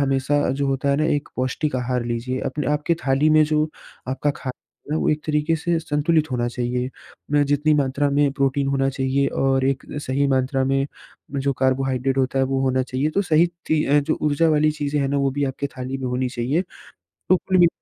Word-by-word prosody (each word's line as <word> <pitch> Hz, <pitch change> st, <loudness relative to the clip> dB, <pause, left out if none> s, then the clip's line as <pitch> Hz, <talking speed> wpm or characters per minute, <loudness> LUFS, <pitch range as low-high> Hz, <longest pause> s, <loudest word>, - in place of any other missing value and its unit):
हमेशा 140 Hz, +1 st, +1 dB
जो 140 Hz, +2 st, -1 dB
होता 135 Hz, 0 st, 0 dB
है 140 Hz, -, +2 dB
न 155 Hz, +1 st, +1 dB
एक 145 Hz, 0 st, -3 dB
पौष्टिक 130 Hz, +2 st, -1 dB
आहार 125 Hz, -1 st, -1 dB
लीजिए। 120 Hz, +2 st, -3 dB
अपने 150 Hz, +3 st, -3 dB
आपकी 150 Hz, +3 st, +1 dB
थाली 140 Hz, +3 st, +3 dB
में 155 Hz, 0 st, +6 dB
जो 155 Hz, 0 st, +1 dB, 0.4 s
आपका 140 Hz, +3 st, 0 dB
खाना 130 Hz, -, -5 dB, 0.4 s
वो -, -, 0 dB
एक 150 Hz, 0 st, -1 dB
तरीके 150 Hz, +1 st, +1 dB
से 170 Hz, +2 st, 0 dB
संतुलित 155 Hz, 0 st, +1 dB
होना 120 Hz, -1 st, 0 dB
चाहिए। 125 Hz, +1 st, -2 dB, 0.5 s
जितनी 145 Hz, +2 st, +2 dB
मात्रा 140 Hz, 0 st, +1 dB
में 145 Hz, 0 st, +3 dB
प्रोटीन 140 Hz, 0 st, 0 dB
होना 135 Hz, -1 st, +1 dB
चाहिए 135 Hz, +1 st, 0 dB
और 135 Hz, -1 st, +2 dB
एक 135 Hz, -1 st, 0 dB, 0.2 s
सही 140 Hz, +1 st, 0 dB
मात्रा 130 Hz, 0 st, +1 dB
में 135 Hz, +1 st, +1 dB, 0.6 s
जो 140 Hz, -, +3 dB
कार्बोहाइड्रेट 130 Hz, 0 st, +1 dB
होता 130 Hz, 0 st, +1 dB
है 135 Hz, -, +3 dB
वो 135 Hz, 0 st, -1 dB
होना 130 Hz, 0 st, +1 dB
चाहिए। 130 Hz, +4 st, -1 dB
तो 200 Hz, +5 st, +1 dB
सही 165 Hz, -1 st, +4 dB, 0.2 s
ती 155 Hz, -1 st, +2 dB, 0.2 s
जो 140 Hz, -, 0 dB
ऊर्जा 150 Hz, +2 st, +2 dB
वाली 155 Hz, 0 st, +3 dB
चीज़ें 145 Hz, -1 st, -2 dB
हैं 135 Hz, -, 0 dB
ना 140 Hz, -, 0 dB
वो 135 Hz, -1 st, +1 dB
भी 145 Hz, +1 st, -1 dB
आपके 135 Hz, +1 st, -3 dB
थाली 130 Hz, +1 st, -4 dB
में 130 Hz, -, -4 dB
होनी 125 Hz, +1 st, -1 dB
चाहिए। 130 Hz, +7 st, -1 dB, 0.5 s
तो 185 Hz, -, 0 dB
कुल 185 Hz, +1 st, 0 dB
मि 175 Hz, -, +7 dB
140 Hz, 200 wpm, -22 LUFS, 130-150 Hz, 0.6 s, मि